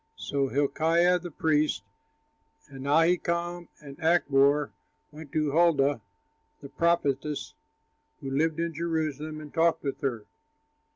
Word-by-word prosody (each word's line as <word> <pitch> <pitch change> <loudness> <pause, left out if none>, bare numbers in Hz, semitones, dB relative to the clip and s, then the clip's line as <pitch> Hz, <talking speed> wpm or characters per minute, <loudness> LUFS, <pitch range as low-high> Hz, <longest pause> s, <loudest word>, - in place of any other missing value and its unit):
So 140 -1 -1
Hilkiah, 165 +6 +2
the 175 +1 -7
priest, 150 - 0 0.8
and 135 -1 -9
Ahikam 170 +2 +1 0.2
and 140 -1 -11
Achbor 145 -3 +3 0.4
went 150 -1 -11
to 155 -2 0
Huldah, 145 -5 +3 0.6
the 140 - -11
prophetess, 150 -3 -1 0.7
who 135 - -6
lived 160 +3 0
in 170 0 -2
Jerusalem 155 -2 -3
and 150 -1 -11
talked 165 0 +2
with 140 -2 -4
her. 120 -6 -2
155 Hz, 115 wpm, -27 LUFS, 140-170 Hz, 0.8 s, Achbor